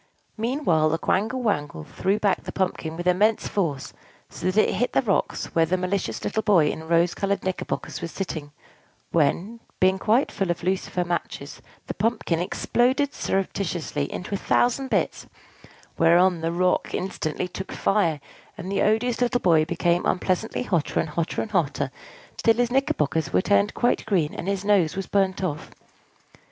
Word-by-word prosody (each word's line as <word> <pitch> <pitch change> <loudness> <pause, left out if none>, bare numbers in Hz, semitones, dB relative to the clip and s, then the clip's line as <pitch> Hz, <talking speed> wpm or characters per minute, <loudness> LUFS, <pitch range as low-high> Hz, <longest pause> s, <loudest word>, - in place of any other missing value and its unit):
Meanwhile 225 - +1
the 165 - 0
Quangle 225 +9 0
Wangle 145 - -1
threw 195 - -1
back 200 -3 +1
the - - -7
pumpkin 170 -4 -2
with 175 - -5
immense 205 +5 +2
force, 160 -9 -2 0.4
so 185 - -3
that 210 +3 +3
it - - -1
hit 245 - -1
the - - +4
rocks 200 -5 -1
where 165 -1 +3
the 185 +3 +1
malicious 185 +1 -2
little 220 - -1
boy 185 -8 +4
in 160 0 -7
rose 170 +1 +3
colored 200 0 -1
knickerbockers 185 -1 -3
was 170 - -4
sitting; 155 -6 -5 0.6
when, 170 +8 +1 0.2
being 190 +1 +3
quite 225 +7 +2
full 195 -2 -2
of 175 0 -2
lucifer 185 0 -1
matches, 175 0 -4 0.2
the - - -4
pumpkin 215 -7 0
exploded 255 +10 +1
surreptitiously 175 -6 -2
into 185 - -5
a 200 - -1
thousand 260 +2 +1
bits; - - -1 0.7
whereon 175 +1 +4
the 165 +1 -1
rocks 180 +1 +1
instantly 180 -2 -3
took 190 +1 -7
fire, 170 -7 +1 0.4
and 185 +3 -6
the 200 - +1
odious 225 +3 +1
little 245 0 +2
boy 165 -6 +4
became 175 +2 +1
unpleasantly 185 +6 0
hotter 175 -10 0
and 160 - -1
hotter 165 +2 -2
and - - -9
hotter, - - 0 0.5
till 225 -1 +3
his 245 +1 +1
knickerbockers 160 - 0
were 90 - +3
turned 100 +2 +2
quite 240 - +1
green, 175 -8 +1
and 175 - -6
his 200 0 -1
nose 195 -5 +3
was 195 0 -3
burnt 195 -1 0
off. 155 -4 -3
185 Hz, 165 wpm, -24 LUFS, 165-210 Hz, 0.7 s, the